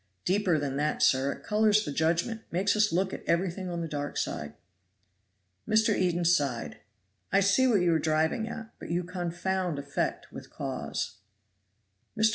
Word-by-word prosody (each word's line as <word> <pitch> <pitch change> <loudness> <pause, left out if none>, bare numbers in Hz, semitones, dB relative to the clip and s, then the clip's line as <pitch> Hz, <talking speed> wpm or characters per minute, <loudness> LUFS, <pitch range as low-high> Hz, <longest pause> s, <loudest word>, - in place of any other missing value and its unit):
"Deeper 185 -3 +2
than 140 -2 -2
that, 150 +1 0
sir 135 +1 +3
it - - -9
colors 215 0 +3
the - - -3
judgment. 170 +9 0
Makes 190 +5 +1
us 215 0 +3
look 190 +2 0
at - - -6
everything 180 +2 0
on 170 -1 -3
the 165 - -3
dark 145 -1 -4
side." 75 +1 -3 1.1
Mr. 220 0 +4
Eden 175 -1 +1
sighed: 145 -8 +1 0.5
"I 195 - +4
see 200 +7 +4
what 215 -7 +3
you 175 -1 +3
are 160 - +2
driving 160 +8 +1
at; 225 -1 -8
but - - -8
you 175 +1 0
confound 180 -1 -2
effect 140 0 -3
with - - -10
cause." - - -4 1.0
Mr. 220 +1 +5
175 Hz, 165 wpm, -29 LUFS, 155-200 Hz, 1.1 s, Mr